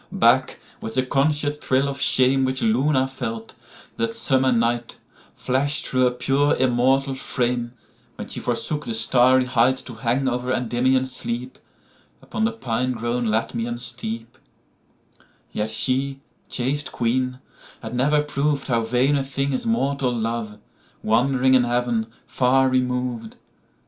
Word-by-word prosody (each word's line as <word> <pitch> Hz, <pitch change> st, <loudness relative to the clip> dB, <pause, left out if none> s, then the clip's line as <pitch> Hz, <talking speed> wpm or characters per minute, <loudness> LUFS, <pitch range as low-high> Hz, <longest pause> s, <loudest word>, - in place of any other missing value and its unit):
Back, -, -, +2 dB, 0.2 s
with 110 Hz, -, -6 dB
the 130 Hz, 0 st, +1 dB
conscious 145 Hz, +2 st, +1 dB
thrill 135 Hz, -1 st, +1 dB
of 140 Hz, 0 st, -4 dB
shameWhich 130 Hz, 0 st, +3 dB
Luna 130 Hz, +4 st, +2 dB
felt, 115 Hz, -4 st, -6 dB, 0.4 s
that 115 Hz, 0 st, -1 dB
summer 130 Hz, -1 st, +2 dB
night, 120 Hz, 0 st, 0 dB, 0.4 s
Flash 140 Hz, +4 st, 0 dB
through 130 Hz, -, -1 dB
her -, -, +4 dB
pure 135 Hz, +4 st, +1 dB
immortal 130 Hz, +2 st, +2 dB
frame, 125 Hz, -2 st, -2 dB, 0.4 s
When -, -, -7 dB
she -, -, -5 dB
forsook 145 Hz, +5 st, -3 dB
the 115 Hz, -, -2 dB
starry 130 Hz, +3 st, +4 dB
heightTo 125 Hz, -1 st, 0 dB
hang 125 Hz, +4 st, 0 dB
over 125 Hz, 0 st, -1 dB
Endymion's 130 Hz, +2 st, +1 dB
sleepUpon 120 Hz, -2 st, -6 dB
the 110 Hz, -, +1 dB
pine 120 Hz, +2 st, -2 dB
grown 120 Hz, +1 st, -2 dB
Latmian 115 Hz, +2 st, -2 dB
steep;—Yet 115 Hz, -2 st, -8 dB
she, 135 Hz, +4 st, 0 dB, 0.3 s
chaste 135 Hz, +3 st, -1 dB
Queen, 125 Hz, +2 st, -1 dB, 0.5 s
had 110 Hz, +1 st, -6 dB
never 145 Hz, +4 st, +2 dB
prov'dHow 140 Hz, -5 st, 0 dB
vain 125 Hz, +5 st, +2 dB
a 140 Hz, -, 0 dB
thing 135 Hz, +1 st, -2 dB
is 130 Hz, -, -2 dB
mortal 140 Hz, -, 0 dB
love, 115 Hz, -2 st, -3 dB, 0.5 s
Wandering 130 Hz, +3 st, +2 dB
in 130 Hz, -1 st, +5 dB
Heaven, 120 Hz, -2 st, 0 dB, 0.2 s
far 130 Hz, +1 st, +2 dB
remov'd. 125 Hz, -3 st, -1 dB
125 Hz, 125 wpm, -22 LUFS, 120-135 Hz, 0.5 s, in